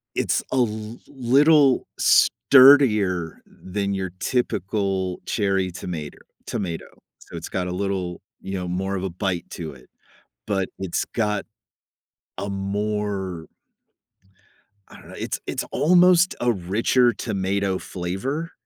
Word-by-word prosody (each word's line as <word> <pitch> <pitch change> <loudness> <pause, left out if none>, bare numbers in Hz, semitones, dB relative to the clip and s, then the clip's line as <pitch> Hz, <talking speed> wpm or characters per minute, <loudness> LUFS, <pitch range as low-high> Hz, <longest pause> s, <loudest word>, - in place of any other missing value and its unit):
It's - - 0
a - - +1
l 110 -1 -1
little 140 +2 +4
sturdier 110 - +5
than 100 +1 -4
your 95 -1 -3
typical 95 -5 -1
cherry 95 -3 0
tomater 85 -4 -6 0.3
tomato. 85 -5 -4 0.3
So - - -11
it's - - -6
got 90 -1 -2
a 90 - -3
little 90 -2 -3 0.2
you 95 - -6
know, 90 -2 -3
more 95 +2 -2
of 95 - -4
a 95 - -2
bite 90 -1 -3
to 80 -3 -6
it, 65 -2 -17 0.6
but 95 -3 -1
it's 95 -3 -2
got 105 -3 0 0.9
a 100 - -3
more 100 -3 -3 1.4
I - - -13
don't - - -15
know, - - -11
it's - - -3
it's - - -3
almost 180 +2 +4
a 120 - +2
richer 115 +5 +2
tomato 100 -3 -1
flavor. 100 - -4
100 Hz, 125 wpm, -23 LUFS, 90-120 Hz, 1.4 s, sturdier